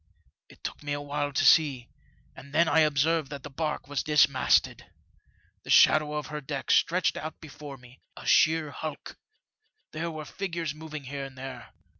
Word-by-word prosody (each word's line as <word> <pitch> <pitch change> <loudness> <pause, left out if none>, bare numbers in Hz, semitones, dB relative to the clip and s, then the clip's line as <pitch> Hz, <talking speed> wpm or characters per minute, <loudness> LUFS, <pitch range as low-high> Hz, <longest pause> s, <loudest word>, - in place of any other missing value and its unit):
It - - -19
took - - -6
me 145 -1 -3
awhile 145 0 -3
to 140 - +1
see, 140 -7 +4 0.5
and 140 +2 -12
then 170 +1 +4
I 160 - +3
observed 155 0 +2
that 140 -2 -8
the 145 - -9
barque 150 +1 -3
was 145 0 -2
dismasted. 145 -3 +3 0.8
The - - -14
shadow 150 -1 +5
of 150 -1 -3
her 150 +1 -6
deck 140 -1 -4
stretched 175 0 +2
out 155 0 -6
before 145 -2 -10
me 125 0 -18
— - - -45
a - - -10
sheer 160 -2 +3
hulk! 155 +1 -7 0.7
There 165 +2 -3
were 155 -2 -7
figures 170 -2 -4
moving 155 -1 -8
here 135 +1 -5
and 135 -1 -12
there. 130 0 -8
150 Hz, 175 wpm, -27 LUFS, 140-155 Hz, 0.8 s, shadow